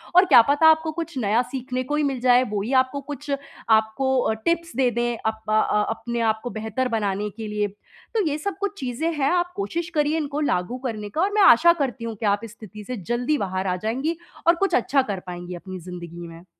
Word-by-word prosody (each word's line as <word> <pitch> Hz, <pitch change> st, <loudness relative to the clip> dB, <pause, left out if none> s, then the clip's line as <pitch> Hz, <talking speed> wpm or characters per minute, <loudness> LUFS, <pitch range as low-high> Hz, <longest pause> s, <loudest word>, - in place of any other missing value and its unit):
और 365 Hz, +2 st, +8 dB
क्या 275 Hz, -9 st, +8 dB
पता 290 Hz, +3 st, +5 dB
आपको 320 Hz, 0 st, +4 dB
कुछ 330 Hz, -2 st, -5 dB
नया 225 Hz, +1 st, +2 dB
सीखने 255 Hz, -1 st, -3 dB
को 295 Hz, +4 st, -2 dB
ही 300 Hz, -, +1 dB
मिल 270 Hz, -3 st, -1 dB
जाए, 250 Hz, 0 st, +5 dB
वो 205 Hz, -4 st, -3 dB
ही 240 Hz, +6 st, -3 dB
आपको 260 Hz, +2 st, +2 dB
कुछ, 290 Hz, +1 st, -8 dB, 0.4 s
आपको 220 Hz, +5 st, +3 dB
अ, 220 Hz, -, +1 dB
टिप्स 335 Hz, -4 st, 0 dB
दे 255 Hz, -1 st, +3 dB
दें 240 Hz, 0 st, -1 dB
अप 220 Hz, 0 st, -2 dB
अ, 215 Hz, 0 st, +4 dB, 0.3 s
अपने 235 Hz, +1 st, -3 dB
आपको 220 Hz, +3 st, -6 dB
बेहतर 220 Hz, +4 st, -2 dB
बनाने 210 Hz, -3 st, -1 dB
के 215 Hz, +2 st, -7 dB
लिए। 210 Hz, 0 st, -1 dB, 0.5 s
तो 430 Hz, -4 st, +2 dB
ये 295 Hz, 0 st, -1 dB
सब 395 Hz, +6 st, -4 dB
कुछ 405 Hz, 0 st, -3 dB
चीज़ें 265 Hz, +6 st, -2 dB
हैं। 285 Hz, -1 st, +1 dB
आप 355 Hz, 0 st, +1 dB
कोशिश 345 Hz, -4 st, -3 dB
करिए 300 Hz, +1 st, +2 dB
इनको 290 Hz, -1 st, -2 dB
लागू 235 Hz, -3 st, 0 dB
करने 210 Hz, -3 st, -4 dB
का 315 Hz, -, -2 dB
और 400 Hz, +2 st, +2 dB
मैं 425 Hz, -, +3 dB
आशा 340 Hz, 0 st, +7 dB
करती 265 Hz, -7 st, -3 dB
हूँ 225 Hz, -, -4 dB
कि 215 Hz, -, -5 dB
आप 205 Hz, +1 st, +2 dB
इस 230 Hz, -, -8 dB
स्थिति 210 Hz, -1 st, -11 dB
से 250 Hz, +2 st, -5 dB
जल्दी 245 Hz, +5 st, +1 dB
बाहर 190 Hz, -2 st, -2 dB
आ 180 Hz, -, +1 dB
जाएँगी 275 Hz, +9 st, -1 dB, 0.3 s
और 335 Hz, -, +7 dB
कुछ 390 Hz, +3 st, +1 dB
अच्छा 270 Hz, +3 st, +3 dB
कर 205 Hz, -7 st, -4 dB
पाएँगी 175 Hz, 0 st, -6 dB
अपनी 185 Hz, +1 st, -8 dB
ज़िंदगी 175 Hz, -1 st, -8 dB
में। 165 Hz, +2 st, -12 dB
250 Hz, 230 wpm, -23 LUFS, 215-300 Hz, 0.5 s, और